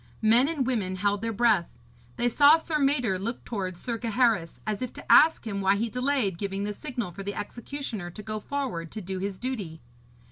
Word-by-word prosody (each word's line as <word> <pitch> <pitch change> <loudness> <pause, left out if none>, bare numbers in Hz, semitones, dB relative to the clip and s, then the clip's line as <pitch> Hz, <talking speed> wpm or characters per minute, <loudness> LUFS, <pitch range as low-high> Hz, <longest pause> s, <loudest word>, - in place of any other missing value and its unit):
Men 230 +5 +5
and 295 -5 -1
women 210 -7 -1
held 205 +1 0
their 230 0 -1
breath. 215 -5 +2 0.4
They 240 0 +2
saw 285 +6 +6
Sir 320 -1 -2
Mador 255 -9 +1
look 230 +5 -4
towards 185 -6 -4
Sir 230 +2 -3
Gaheris, 225 -6 +1
as 215 0 -2
if 255 - -3
to - - -4
ask 315 -4 +6
him 200 -3 -3
why 195 +1 +4
he 225 +3 -1
delayed 250 -7 0
giving 200 -1 -2
the 210 0 -2
signal 240 -6 -5
for 195 - -8
the 200 +1 -4
executioner 235 -4 -5
to 210 +5 -10
go 215 0 -4
forward 220 - -4
to 215 - -5
do 190 0 -5
his 195 0 -3
duty. 205 -11 -4
220 Hz, 205 wpm, -27 LUFS, 195-250 Hz, 0.4 s, saw